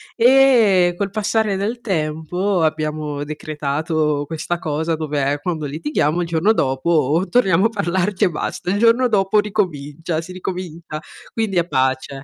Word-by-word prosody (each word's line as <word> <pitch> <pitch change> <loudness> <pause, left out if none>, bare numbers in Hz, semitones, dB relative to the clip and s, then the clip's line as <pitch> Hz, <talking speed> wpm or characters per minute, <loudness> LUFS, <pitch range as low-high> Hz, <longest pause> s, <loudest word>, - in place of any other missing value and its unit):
Ehm, 230 -8 +5
col 200 +1 -3
passare 215 0 0
del 220 +5 -3
tempo, 175 0 -1
abbiamo 155 -2 -2
decretato 150 0 -2
questa 165 +3 -3
cosa, 160 +1 -2
dove 145 -2 -1
quando 160 -2 -3
litighiamo 150 +2 -1
il 170 - -2
giorno 165 +5 +2
dopo 150 +3 +1
torniamo 195 -6 +3
a - - +4
parlarci 190 -2 -1
e - - +4
basta. 175 +2 -3
Il 200 - 0
giorno 235 +3 +4
dopo 205 -2 +2
ricomincia 165 -6 -2
si 175 +2 -10
ricomincia, 175 -4 -6 0.3
quindi 220 -5 -1
è 170 0 +2
pace. 130 -1 -1
170 Hz, 140 wpm, -20 LUFS, 155-200 Hz, 0.3 s, Ehm